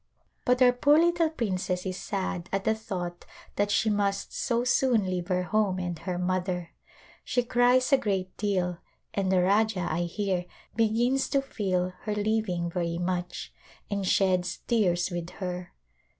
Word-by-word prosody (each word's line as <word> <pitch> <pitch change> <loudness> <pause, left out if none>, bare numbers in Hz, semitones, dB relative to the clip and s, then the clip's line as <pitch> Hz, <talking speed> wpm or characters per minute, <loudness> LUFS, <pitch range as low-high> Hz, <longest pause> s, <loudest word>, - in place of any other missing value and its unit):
But 250 +1 +4
our 250 - +7
poor 285 +4 +4
little 340 0 +3
princess 185 - -2
is 185 -1 -3
sad 190 -3 -3
at 195 0 -1
the 220 - +3
thought 180 -5 -5 0.3
that 205 0 +1
she 210 +1 +2
must 200 -1 -1
so 235 0 0
soon 250 -4 +3
leave 180 -2 -2
her 180 -1 +1
home 205 -1 +1
and 175 -3 -3
her 175 +2 -3
mother. 180 -1 -1 0.5
She 245 - 0
cries 245 +3 +3
a 270 - +6
great 190 -5 -2
deal, 180 -4 -1 0.3
and 195 -2 0
the 185 -1 +4
Rajah, 200 -1 +2
I 170 +2 0
hear, 185 0 -2 0.3
begins 235 +4 +2
to 275 - +2
feel 185 -7 -1
her 210 -1 -1
leaving 205 -5 0
very 170 -1 -1
much, 180 0 -3 0.4
and 200 -1 -1
sheds 185 -1 +1
tears 180 -6 +2
with 175 -1 -4
her. 180 -1 -5
190 Hz, 160 wpm, -28 LUFS, 180-220 Hz, 0.5 s, our